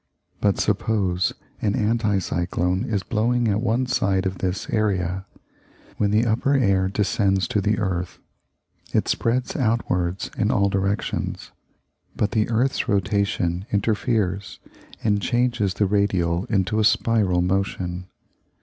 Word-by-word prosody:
But 100 -2 +1
suppose 100 -3 +1 0.3
an 105 -2 +1
anti 110 -1 +1
cyclone 90 0 -1
is 100 -4 -1
blowing 120 +3 +1
at 105 0 +1
one 120 +2 +1
side 95 -6 +1
of 95 -1 -2
this 95 0 -2
area. 95 -3 0 0.7
When 100 - +1
the 110 +3 +3
upper 120 +5 +1
air 95 -7 +3
descends 95 -2 +1
to 105 - +1
the 105 +1 +1
earth, 90 -4 -2 0.8
it - - +2
spreads 120 +2 0
outwards 100 - -1
in 105 - +1
all 100 -1 +2
directions; 100 +1 -2 0.6
but 105 - 0
the 110 -1 +1
earth's 120 +4 0
rotation 100 -2 0
interferes 100 -2 0 0.5
and 105 -2 +2
changes 120 -5 0
the 105 - +2
radial 95 -3 +1
into 100 0 0
a - - +3
spiral 105 -4 +2
motion. 90 -1 -2
100 Hz, 130 wpm, -23 LUFS, 95-110 Hz, 0.8 s, the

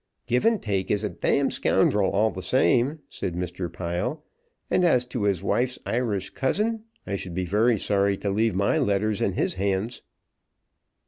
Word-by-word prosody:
"Givantake 120 - +1
is 105 0 +1
a 105 - 0
d - - +1
scoundrel 100 -2 +2
all 110 +2 +2
the 95 - -6
same," 130 - +2
said 90 - -5
Mr. 90 -1 -4
Pile; 95 - -3 0.4
"and 180 - +2
as 125 -8 +3
for 120 -4 -2
his 95 -2 0
wife's 125 +5 0
Irish 110 -6 -1
cousin, 215 +10 -1 0.2
I 100 - -2
should 90 -3 -6
be 95 0 -1
very 110 +6 +2
sorry 100 0 +1
to 100 - -2
leave 110 0 +1
my 100 +1 +2
letters 100 +1 0
in 100 - +1
his - - 0
hands." 100 +4 -2
105 Hz, 165 wpm, -25 LUFS, 95-125 Hz, 0.4 s, as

